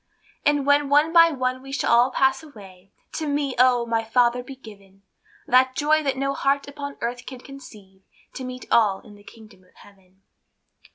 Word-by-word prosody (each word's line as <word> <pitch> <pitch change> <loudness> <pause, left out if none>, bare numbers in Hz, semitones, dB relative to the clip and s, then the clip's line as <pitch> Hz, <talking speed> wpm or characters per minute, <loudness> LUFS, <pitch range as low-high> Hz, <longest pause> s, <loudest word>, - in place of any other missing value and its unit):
And 290 -2 +1
when 285 0 +2
one 295 +3 +3
by 335 -1 +7
one 255 -3 -3
we 270 0 -11
shall 275 - -1
all 240 +2 +4
pass 265 +1 +1
away, 195 -10 -16 0.2
To 315 - -5
me, 285 -2 -2
oh! 250 -1 +3
my 230 -1 -1
Father, 240 +2 +1
be 265 +2 -11
given 200 -5 -16 0.4
The 255 +1 +4
joy 310 +1 +2
that 275 -3 -2
no 275 +1 -1
heart 275 +1 -1
upon 285 0 -8
earth 245 +2 -5
can 260 -2 -9
conceive, 210 -9 -14 0.3
To 260 - -7
meet 255 0 -8
all 205 -4 +2
in 210 - -16
the 205 0 -18
kingdom 215 -3 -17
of 185 - -29
Heaven. 190 -1 -22
255 Hz, 185 wpm, -23 LUFS, 215-280 Hz, 0.4 s, by